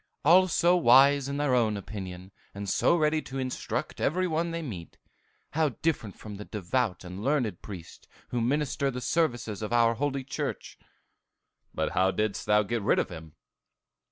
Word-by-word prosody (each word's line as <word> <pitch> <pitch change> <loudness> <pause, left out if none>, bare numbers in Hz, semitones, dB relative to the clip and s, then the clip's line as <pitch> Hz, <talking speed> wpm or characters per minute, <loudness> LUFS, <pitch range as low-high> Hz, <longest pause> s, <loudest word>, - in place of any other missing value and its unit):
All 185 +3 +7
so 175 0 +3
wise 140 -2 +5
in 140 - -3
their 145 -3 +1
own 110 -4 +2
opinion, 95 -2 -8 0.2
and 100 0 -5
so 170 - +3
ready 155 -1 +2
to 135 - -7
instruct 130 -1 -3
every 185 +6 +1
one 165 +1 -1
they 165 0 -4
meet. 95 - -8 0.5
How 155 0 +2
different 145 - -1
from 105 -2 -9
the 105 - -8
devout 105 0 -2
and 90 +3 -7
learned 125 - 0
priests 95 -6 -10 0.2
who 120 - -1
minister 140 +2 0
the 125 -1 -4
services 120 - -1
of 105 - -4
our 115 -1 +4
holy 140 +2 -2
church!" 130 - -5 0.9
"But - - -2
how 95 +1 +3
didst 105 +1 -2
thou 105 0 +4
get 115 +2 -2
rid 100 - +2
of - - 0
him?" 80 -3 -10
120 Hz, 170 wpm, -28 LUFS, 100-145 Hz, 0.9 s, All